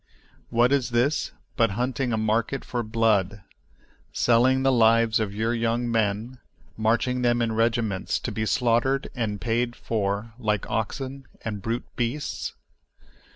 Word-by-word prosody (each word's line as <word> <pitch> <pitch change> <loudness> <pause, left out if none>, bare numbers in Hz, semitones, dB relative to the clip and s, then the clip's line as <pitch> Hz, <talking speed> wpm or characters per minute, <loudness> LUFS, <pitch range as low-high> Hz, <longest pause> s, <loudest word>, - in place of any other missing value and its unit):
What 120 +2 +3
is 140 -4 +2
this 125 +5 +1 0.2
but 115 -3 +3
hunting 125 +1 -1
a 110 - +1
market 110 +5 0
for 120 - -2
blood, 110 -3 +1 0.7
selling 130 +3 +3
the 135 - +4
lives 115 -2 +4
of 110 -2 -1
your 110 +3 -1
young 115 +1 0
men, 115 +3 -1 0.4
marching 120 +3 +1
them 120 -1 +2
in 115 -1 +1
regiments 115 -3 0
to - - -3
be 110 0 -2
slaughtered 125 +4 +1
and 110 -5 -2
paid 120 +2 -1
for 105 0 -2
like 105 -4 -1
oxen 135 +5 -3 0.2
and 105 -3 -3
brute 115 +4 -2
beasts? 125 +5 -3
115 Hz, 140 wpm, -25 LUFS, 110-125 Hz, 0.7 s, the